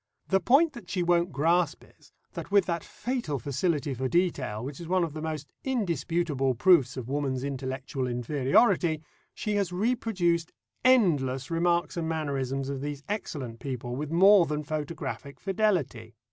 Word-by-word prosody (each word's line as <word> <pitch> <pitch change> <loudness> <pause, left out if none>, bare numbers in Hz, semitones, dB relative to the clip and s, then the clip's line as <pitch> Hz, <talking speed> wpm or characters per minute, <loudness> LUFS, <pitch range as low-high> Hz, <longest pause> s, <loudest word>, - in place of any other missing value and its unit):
The 195 - +4
point 280 - +4
that 240 -8 -11
she 180 -3 0
won't 175 0 +2
grasp 165 +2 +1 0.2
is, - - -22 0.2
that - - -6
with 200 -2 +4
that 170 -3 -2
fatal 240 - -3
facility 145 +1 -1
for 130 +1 -2
detail, 130 - 0
which 140 0 -7
is 170 - -7
one 185 0 +2
of 165 -3 -3
the 155 - -6
most 155 -2 -5
indisputable 170 - 0
proofs 135 -1 +4
of 125 -3 -5
woman's 135 -2 -1
intellectual 130 -1 -3
inferiority, 150 - +2 0.3
she 210 -1 -1
has 195 -3 0
reproduced 180 -5 0 0.3
endless 150 - +3
remarks 170 +1 +1
and 165 -1 -2
mannerisms 135 -4 -2
of 140 -1 -4
these 145 0 -5
excellent 140 - -4
people 125 -3 -4
with 145 +2 -4
more 185 +2 +6
than 150 0 -2
photographic 150 -1 -5
fidelity. 175 - -1
155 Hz, 155 wpm, -28 LUFS, 135-180 Hz, 0.3 s, more